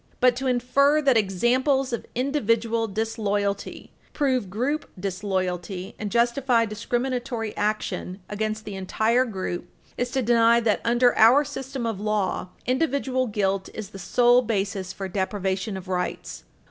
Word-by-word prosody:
But 250 -1 +4
to 265 +1 -2
infer 270 +4 +3
that 270 -3 +4
examples 245 +6 +2
of 235 - -4
individual 230 -4 +1
disloyalty 205 -1 -2 0.2
prove 260 -9 0
group 260 +10 -2
disloyalty 185 -1 -3
and 210 - -3
justify 235 +1 +2
discriminatory 240 +1 -3
action 205 -3 -2
against 215 +1 -3
the 210 - -6
entire 220 +6 +1
group 185 -5 -4 0.3
is 245 - 0
to 265 +1 -1
deny 230 0 +5
that, 220 -3 +1
under 240 +1 +3
our 250 +7 +7
system 265 -2 -5
of 220 -4 -3
law, 210 -4 -1 0.2
individual 260 -1 0
guilt 195 -3 -1
is 215 -2 -6
the 195 - -9
sole 245 +6 +4
basis 200 -4 -2
for 195 0 -5
deprivation 190 +1 -2
of 190 0 -9
rights. 180 -1 -4
225 Hz, 135 wpm, -25 LUFS, 195-250 Hz, 0.3 s, our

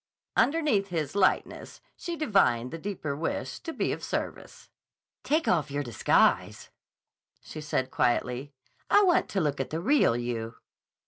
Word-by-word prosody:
Underneath 280 -10 +2
his 160 -6 -3
lightness, 195 -2 0 0.2
she 345 - -5
divined 195 - +2
the 165 - -6
deeper 165 -7 -4
wish 130 -4 -3
to 325 - -6
be - - -1
of - - -5
service. - - -5 0.6
"Take 315 +3 +1
off 160 -6 +2
your 145 +1 -2
disguise," 120 -5 +1 0.7
she 155 - -8
said 130 -3 -2
quietly, 125 +3 0 0.4
"I 410 - +6
want 360 -3 +3
to 195 - -1
look 145 -5 -1
at 135 - -2
the 160 - -3
real 210 - +3
you." 115 -2 -4
155 Hz, 145 wpm, -28 LUFS, 130-205 Hz, 0.7 s, I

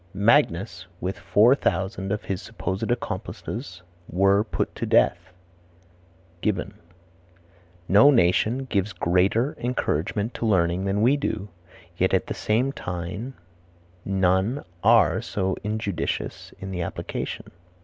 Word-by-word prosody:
"Magnus, 95 - +2
with 95 +1 -4
four 115 +5 +5
thousand 95 -4 -1
of 105 - -2
his 95 -2 -3
supposed 95 +4 -4
accomplices 120 -4 -4 0.3
were 100 +3 +3
put - - -3
to - - -4
death." - - +2 1.1
Gibbon. 100 -1 -1 1.1
"No 105 +9 +7
nation 115 +2 +3
gives 100 -4 -1
greater 95 - +1
encouragements 110 -2 -1
to 115 - 0
learning 90 -2 +2
than 100 +2 0
we 135 +5 +4
do; 110 -7 -3 0.5
yet 95 +1 +2
at 95 - 0
the - - -4
same 120 +6 0
time 90 - -5 0.7
none 95 +7 +1 0.2
are 110 -6 +5
so 95 -1 -2
injudicious 105 -5 -3
in 95 0 -7
the 90 -2 -3
application." 85 - -5
100 Hz, 120 wpm, -25 LUFS, 95-115 Hz, 1.1 s, No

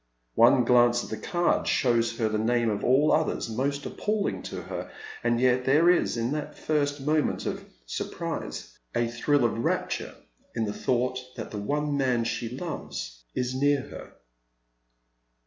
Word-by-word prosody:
One 125 - +6
glance 120 0 +4
at - - -9
the - - -1
card 175 -1 0
shows 115 -3 +2
her 115 - +1
the 110 0 -1
name 115 0 +2
of 105 - -3
all 140 +4 +4
others 160 0 +1
most 140 +5 -2
appalling 210 -1 -1
to - - -6
her, - - -6 0.3
and 120 0 +2
yet 125 0 +3
there 155 +6 +5
is, 175 -8 +1
in 115 +2 -1
that 150 0 -4
first 145 -2 0
moment 150 +2 0
of - - -3 0.2
surprise, - - -5 0.2
a 120 - +2
thrill 120 +3 +1
of 115 - 0
rapture - - -1 0.4
in 115 - 0
the 105 - -3
thought 125 +2 0 0.2
that - - -6
the 105 - -4
one 145 +7 -1
man 125 -4 +2
she 115 +1 -3
'oves - - -6
is 125 0 -1
near 140 +1 +2
her. - - -10
125 Hz, 165 wpm, -27 LUFS, 115-145 Hz, 0.4 s, One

